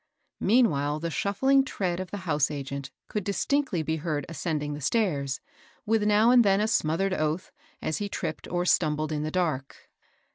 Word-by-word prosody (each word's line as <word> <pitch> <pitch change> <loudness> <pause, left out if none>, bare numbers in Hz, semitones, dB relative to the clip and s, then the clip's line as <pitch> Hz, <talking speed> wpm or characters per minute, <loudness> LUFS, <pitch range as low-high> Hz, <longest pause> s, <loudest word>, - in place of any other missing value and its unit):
Meanwhile 155 - +2
the 165 +1 -3
shuffling 265 +10 +2
tread 185 -9 -2
of 185 -1 -5
the 205 - -5
house 150 -4 +2
agent 140 -2 -5 0.2
could 210 - -3
distinctly 205 - 0
be 160 +1 -1
heard 150 -3 -2
ascending 155 -2 -3
the 145 - -6
stairs, 140 - 0 0.5
with 225 0 +2
now 210 +3 +4
and 250 -1 +7
then 195 -1 +3
a 215 - +2
smothered 190 -1 +1
oath, 155 +1 -1 0.3
as 155 - -1
he 205 -1 -3
tripped 155 -5 -4
or 175 0 -1
stumbled 155 -3 +1
in 150 -1 -1
the 155 - -2
dark. 155 -6 -3
170 Hz, 175 wpm, -27 LUFS, 150-205 Hz, 0.5 s, and